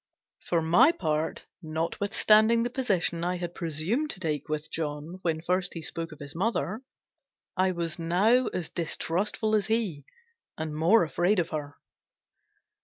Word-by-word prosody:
For 170 -2 0
my 170 - +6
part, 155 - -2 0.2
notwithstanding 210 +7 +2
the 240 - -2
position 190 -10 0
I 180 +1 0
had 175 -1 -5
presumed 175 - -1
to 195 - -5
take 155 -4 -2
with 155 0 -3
John 155 +3 -4
when 160 -3 -1
first 180 +2 0
he 165 - -5
spoke 165 +1 -5
of 155 - -10
his 145 0 -7
mother, 215 +3 -1 0.7
I 185 0 +3
was 170 -2 -3
now 200 +10 +3
as 180 -3 -4
distrustful 190 +6 -1
as 205 -1 +1
he, 210 -11 -1 0.5
and 155 -1 -4
more 170 +8 +5
afraid 175 +6 +1
of 175 -1 +1
her. 145 -2 -5
170 Hz, 150 wpm, -28 LUFS, 160-205 Hz, 0.7 s, my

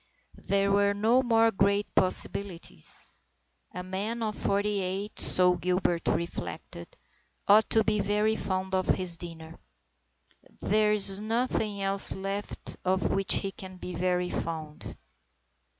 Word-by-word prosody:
There 200 0 +1
were 200 0 +2
no 225 +5 +2
more 225 -2 +2
great 200 +1 +1
possibilities. 185 - -1 0.5
A 180 - -7
man 205 +5 -4
of 215 -1 -3
forty 205 0 -1
eight, 190 +3 -4
so 180 -1 +5
Gilbert 180 -2 -1
reflected, 170 0 -4 0.6
ought 210 +2 +5
to 220 - +3
be 210 0 0
very 210 +2 0
fond 190 -2 -4
of 185 -1 0
his 180 -2 +1
dinner. 165 -1 -10 1.0
There 215 0 +1
is 195 -2 +7
nothing 215 -2 -2
else 195 0 +2
left 195 +1 -6
of 190 +1 0
which 195 -1 +3
he 195 - -1
can 185 -1 -11
be 180 0 -8
very 180 +1 -1
fond. 155 -2 -6
195 Hz, 130 wpm, -27 LUFS, 180-210 Hz, 1.0 s, is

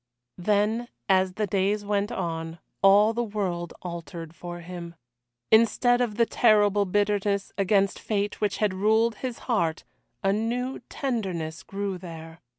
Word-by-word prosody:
Then, 210 +5 +1 0.2
as 185 -1 +3
the 210 +2 -1
days 200 +2 0
went 205 +1 0
on, 165 -3 -3 0.2
all 205 +3 +6
the 235 - -1
world 185 -6 -3
altered 165 -2 -7
for 175 +1 -8
him. 170 -1 -8 0.6
Instead 245 +2 +4
of 230 -4 0
the 230 +1 +4
terrible 205 -3 +4
bitterness 205 0 0
against 195 0 +2
fate 205 -1 -2
which 210 -2 0
had 210 -3 +1
ruled 220 +3 +2
his 250 -3 -4
heart, 170 -10 0 0.4
a 195 0 +3
new 245 +5 -2
tenderness 185 - -3
grew 195 -2 -4
there. 165 -2 -10
200 Hz, 140 wpm, -26 LUFS, 175-215 Hz, 0.6 s, all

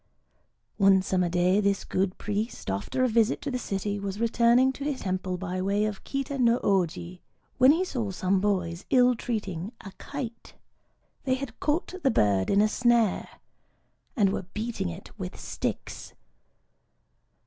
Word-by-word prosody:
One 195 -2 +5
summer 180 -2 +1
day 180 +3 +3
this 200 -1 0
good 185 0 -1
priest, 210 - -3
after 100 - -1
a - - +4
visit 230 -1 +2
to 285 - -3
the 250 - -2
city, 205 -1 -3
was 200 0 -4
returning 235 +3 +4
to 275 - -7
his 285 -2 -2
temple 185 -1 -2
by 185 0 -3
way 200 +2 +1
of 215 -2 -4
Kita 275 0 -3
no 235 -1 +4
Ōji, 180 -2 0 0.4
when 255 +2 +8
he 345 +5 +2
saw 235 - -3
some 190 0 0
boys 180 -4 -1
ill 250 -1 +5
treating 210 -5 -4
a 195 - -9
kite. 245 -5 -7 0.7
They 260 -1 +2
had 260 -3 -7
caught 310 +5 -1
the 275 - +3
bird 100 - +2
in 200 - +4
a - - +4
snare, 235 -2 +2 0.9
and 200 -6 +3
were 180 - -4
beating 220 - -2
it 85 - -9
with - - -6
sticks. - - -5
205 Hz, 160 wpm, -27 LUFS, 185-245 Hz, 0.9 s, when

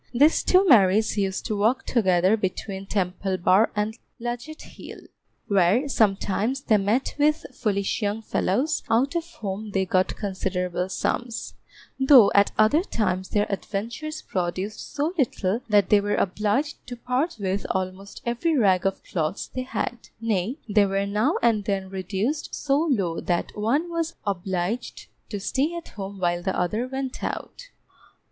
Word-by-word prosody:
These 295 +6 +5
two 375 +1 +4
Marys 215 - +5
used 195 -2 -1
to 215 - -1
walk 225 +6 +1
together 185 -3 +3
between 195 -1 -4
Temple 190 -1 -1
Bar 185 +5 +4
and 210 +2 -2 0.2
Ludgate 240 +6 -5
Hill, - - -11 0.5
where 200 +7 +3
sometimes 220 +2 +1
they 220 -5 +3
met 210 +7 0
with 300 +2 +2
foolish 210 -1 -1
young 210 +2 -1
fellows 260 +11 0
out 250 +7 +2
of 340 0 -2
whom 205 +1 -4
they 195 -1 0
got 185 0 +1
considerable 185 -2 -2
sums, 235 +4 -2 0.5
though 265 -6 +7
at 200 0 +4
other 220 +9 +4
times 190 - -2
their 205 0 +1
adventures 230 +11 -4
produced 185 +3 -3
so 300 +4 -1
little 220 -4 0
that 205 -3 +4
they 205 -1 +6
were 205 0 0
obliged 215 +10 0
to 245 - -6
part 255 +6 -1
with 195 0 -2
almost 185 +1 -4
every 285 +7 0
rag 195 -5 +3
of 195 - -3
clothes 165 +2 -3
they 255 - -2
had; 245 -2 -4
nay, 225 +2 -1
they 205 -1 +4
were 195 +1 0
now 210 +10 +1
and 220 -4 +3
then 195 -2 -2
reduced 195 - -2
so 275 -1 0
low 185 - 0
that 175 -1 -2
one 240 +11 +1
was 335 -1 -3
obliged 190 +3 -3 0.2
to 205 - -4
stay 270 - -1
at 340 - -7
home 200 -1 -7
while 175 -1 0
the 190 +2 -1
other 210 +8 -1
went 265 0 -5
out. - - -5
210 Hz, 155 wpm, -25 LUFS, 190-255 Hz, 0.5 s, though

